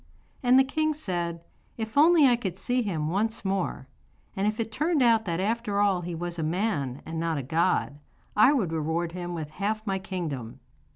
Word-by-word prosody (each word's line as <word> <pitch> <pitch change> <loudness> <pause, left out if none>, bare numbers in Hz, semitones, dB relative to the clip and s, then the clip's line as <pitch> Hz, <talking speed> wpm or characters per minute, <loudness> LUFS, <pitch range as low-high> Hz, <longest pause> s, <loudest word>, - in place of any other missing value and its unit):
And 250 0 +5
the 265 - +7
king 310 +3 0
said: 170 - -3 0.3
'If 220 -1 -5
only 315 +1 +6
I 250 -2 +5
could 190 -7 -4
see 245 +6 0
him 160 -9 -2
once 220 +3 -1
more, 190 -8 -2 0.5
and 195 +2 0
if 215 +1 -1
it 225 -1 -2
turned 300 +4 +1
out 225 -2 +4
that 170 -2 -2
after 210 0 -1
all 200 -3 +2
he 175 0 -5
was 175 0 -4
a - - 0
man 155 - -1
and 160 0 -4
not 165 -1 -1
a 140 - -3
god, 160 0 0 0.4
I 215 +6 +6
would 220 - +1
reward 165 +2 -1
him 175 0 -5
with 155 -2 -5
half 215 +6 -2
my 195 -2 -1
kingdom. 165 - -5
190 Hz, 195 wpm, -27 LUFS, 165-225 Hz, 0.5 s, the